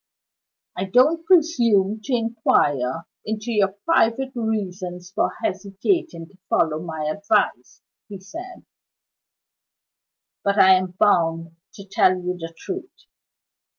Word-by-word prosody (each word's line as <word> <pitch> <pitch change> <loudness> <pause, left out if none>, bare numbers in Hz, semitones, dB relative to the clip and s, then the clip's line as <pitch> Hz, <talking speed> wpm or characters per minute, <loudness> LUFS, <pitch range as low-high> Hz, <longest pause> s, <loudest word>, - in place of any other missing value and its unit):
"I 185 - -2
don't 300 - +3
presume 235 - +3
to 265 - 0
inquire 165 - 0 0.2
into 220 +2 -4
your 200 -3 +2
private 265 -4 +2
reasons 185 -6 -4
for - - 0
hesitating 200 - -2
to 190 - -24
follow 155 -1 +1
my 160 -2 -5
advice," 200 - -1 0.3
he 200 -2 -8
said; 340 - -10 1.8
"but 200 +1 +1
I 190 -1 +7
am 185 -1 0
bound 165 -5 +2 0.2
to 200 - -11
tell 190 -1 +3
you 180 0 -3
the 165 -2 -7
truth. 375 - -6
200 Hz, 115 wpm, -22 LUFS, 180-235 Hz, 1.8 s, I